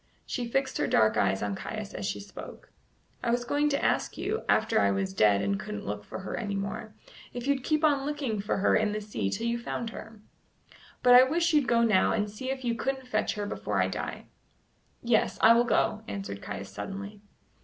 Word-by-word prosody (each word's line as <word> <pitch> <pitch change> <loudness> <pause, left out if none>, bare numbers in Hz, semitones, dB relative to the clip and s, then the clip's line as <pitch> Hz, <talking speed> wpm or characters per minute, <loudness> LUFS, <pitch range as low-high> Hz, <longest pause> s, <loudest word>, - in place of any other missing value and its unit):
She 245 -2 -3
fixed 265 +2 -1
her - - +1
dark 110 0 +3
eyes 95 +1 +1
on 100 -1 -1
Caius 215 - -6
as 195 - -4
she 200 - -3
spoke. 205 - -11 0.5
"I 240 - -1
was 240 +1 +1
going 290 +4 +1
to 280 -1 0
ask - - 0
you, 435 +3 -2
after 220 - +3
I 100 - +4
was 95 -1 -1
dead 100 0 +4
and 100 0 0
couldn't 105 -1 -6
look 105 +1 -4
for - - -7
her 190 - -5
any 205 -3 -3
more, 200 +2 -5 0.4
if 245 0 -4
you'd 280 -2 +1
keep 310 +2 +1
on 290 -3 +3
looking 275 -7 -2
for 205 - -1
her 195 - +3
in 215 -1 +2
the 215 - -2
sea 205 - -3
till 225 - -3
you 235 0 0
found 235 -1 -4
her. 225 -1 -10 0.8
But 245 - +7
I 250 - +10
wish 335 +4 +1
you'd 295 -5 +3
go 235 -1 +3
now 215 -5 +3
and 205 -1 -1
see 255 +5 -6
if 265 -1 -3
you 235 - +1
couldn't 265 +2 -2
fetch 215 -2 0
her 205 -1 -3
before 205 - -2
I - - +2
die." - - -5 0.8
"Yes, 235 -2 +2
I 225 - +7
will 235 +1 +4
go," 215 -2 +1
answered 195 - -5
Caius 100 -1 -6
suddenly. 200 +1 -7
220 Hz, 220 wpm, -28 LUFS, 195-255 Hz, 0.8 s, I